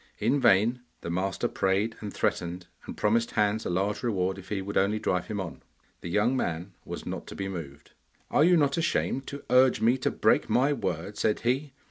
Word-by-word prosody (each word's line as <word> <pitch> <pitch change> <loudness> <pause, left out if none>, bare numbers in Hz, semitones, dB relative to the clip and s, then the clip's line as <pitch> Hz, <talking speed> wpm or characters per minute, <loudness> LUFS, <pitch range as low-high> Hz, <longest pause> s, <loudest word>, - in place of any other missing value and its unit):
In 125 +7 +1
vain 115 +2 +4 0.2
the 85 - -4
master 95 +2 -1
prayed 100 +4 0
and 105 -2 -5
threatened, 90 -1 -2 0.2
and - - -7
promised 115 +2 +2
Hans 105 0 +1
a - - -2
large 100 +4 0
reward 95 -5 -1
if 95 - -13
he 105 - -1
would 100 +1 -5
only 100 +3 +2
drive 90 -4 -1
him 105 -2 -3
on. 95 -3 -6 0.4
The 85 - -7
young 105 +8 +2
man 85 -4 -2
was - - -7
not - - -5
to - - -8
be 95 - -3
moved. 75 -7 -8 0.4
'Are 150 - +4
you 175 +1 +5
not 140 -1 +2
ashamed 155 -5 0
to 140 - -7
urge 130 -2 +5
me 120 +4 +3
to - - +1
break - - +2
my 135 +4 +3
word?' 95 - -3
said 105 - +1
he. 135 +4 0
105 Hz, 205 wpm, -28 LUFS, 95-125 Hz, 0.4 s, you